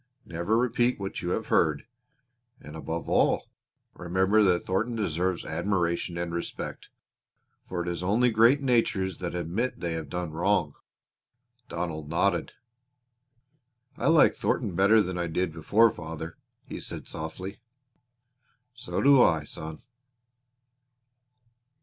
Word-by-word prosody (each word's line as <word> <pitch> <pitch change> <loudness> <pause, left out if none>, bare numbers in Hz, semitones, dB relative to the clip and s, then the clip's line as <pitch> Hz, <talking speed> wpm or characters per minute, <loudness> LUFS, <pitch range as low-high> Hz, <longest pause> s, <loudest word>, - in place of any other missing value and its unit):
Never 85 +6 -1
repeat 120 0 +1
what 95 -1 -4
you 85 - -3
have - - -2
heard. 75 +2 +2 0.7
And 75 +1 -11
above 80 +1 -5
all - - +2 0.4
remember 95 +4 +2
that 90 -4 +3
Thornton 115 +6 -1
deserves 90 -3 -1
both - - -7
admiration 85 0 -1
and 85 -1 -3
respect, 85 - -5 0.8
for 90 -2 -2
it - - -8
is 85 0 -3
only 110 +7 +2
great 115 +6 +5
natures 110 -8 +1
that 90 -1 -4
admit 90 +9 -2
they 85 -2 -2
have 80 -3 -5
done 90 -1 -4
wrong." 85 -2 +1 1.0
Donald 80 -3 -4
nodded. 85 +2 0 1.4
"I - - -2
like 165 -1 +6
Thornton 105 -8 -1
better 100 +4 +5
than 90 -1 -4
I 85 - -1
did 85 0 -1
before 105 +8 +4
father," 80 0 -7 0.3
he - - -7
said - - -7
softly. 95 +5 -7 1.1
"So 125 0 -4
do 140 -2 +7
I, 80 -9 +4
son!" 80 +2 -8
90 Hz, 130 wpm, -27 LUFS, 85-105 Hz, 1.4 s, do